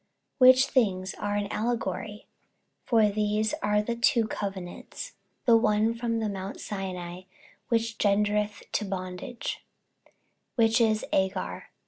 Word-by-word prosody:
48:004:024 255 Hz, -, +10 dB
Which 260 Hz, +1 st, +7 dB
things 190 Hz, -7 st, +1 dB
are 205 Hz, 0 st, -1 dB
an 205 Hz, 0 st, -1 dB
allegory: 225 Hz, -2 st, -2 dB, 0.6 s
for 220 Hz, -3 st, +4 dB
these 210 Hz, +1 st, 0 dB
are 210 Hz, 0 st, +2 dB
the 235 Hz, +2 st, -2 dB
two 235 Hz, -1 st, +3 dB
covenants; 195 Hz, -, -6 dB, 0.3 s
the 235 Hz, -3 st, +6 dB
one 220 Hz, 0 st, +3 dB
from 230 Hz, 0 st, -2 dB
the 220 Hz, -1 st, -1 dB
mount 195 Hz, -1 st, -5 dB
Sinai, 185 Hz, -3 st, -5 dB, 0.5 s
which 230 Hz, -1 st, 0 dB
gendereth 210 Hz, 0 st, +1 dB
to -, -, 0 dB
bondage, 185 Hz, +4 st, -5 dB, 0.9 s
which 225 Hz, 0 st, +4 dB
is 220 Hz, -1 st, +2 dB
Agar. 190 Hz, 0 st, -1 dB
210 Hz, 125 wpm, -28 LUFS, 195-230 Hz, 0.9 s, 48:004:024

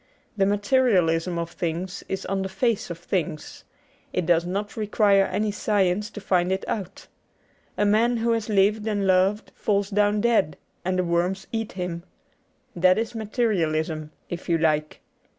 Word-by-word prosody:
The 195 Hz, -2 st, +2 dB
materialism 195 Hz, -6 st, +2 dB
of 170 Hz, 0 st, -3 dB
things 175 Hz, +2 st, -4 dB
is 190 Hz, -, -3 dB
on 195 Hz, 0 st, -1 dB
the 190 Hz, -, -3 dB
face 230 Hz, +1 st, 0 dB
of 170 Hz, -, -5 dB
things: 175 Hz, -2 st, -4 dB, 0.5 s
it 180 Hz, -, -1 dB
does 170 Hz, 0 st, +2 dB
not 200 Hz, +3 st, -3 dB
require 205 Hz, -2 st, +3 dB
any 210 Hz, +3 st, -1 dB
science 205 Hz, -1 st, 0 dB
to 210 Hz, -, -8 dB
find 180 Hz, -2 st, +1 dB
it 190 Hz, 0 st, -1 dB
out. 195 Hz, -3 st, -5 dB, 0.7 s
A 205 Hz, -, +2 dB
man 225 Hz, +4 st, +3 dB
who 230 Hz, +1 st, +1 dB
has 225 Hz, -1 st, -1 dB
lived 210 Hz, +1 st, +2 dB
and 205 Hz, -2 st, 0 dB
loved 190 Hz, +3 st, +2 dB
falls 200 Hz, -1 st, 0 dB
down 205 Hz, +1 st, +2 dB
dead 210 Hz, -10 st, +2 dB, 0.3 s
and 185 Hz, +1 st, -1 dB
the 185 Hz, -, +2 dB
worms 175 Hz, +3 st, 0 dB
eat 225 Hz, -2 st, -3 dB
him. 180 Hz, -2 st, -4 dB, 0.7 s
That 185 Hz, +1 st, +4 dB
is 225 Hz, +1 st, -2 dB
Materialism, 165 Hz, -, -1 dB, 0.2 s
if 175 Hz, +1 st, -7 dB
you 170 Hz, -, +3 dB
like. 155 Hz, -1 st, 0 dB
195 Hz, 160 wpm, -24 LUFS, 175-210 Hz, 0.7 s, That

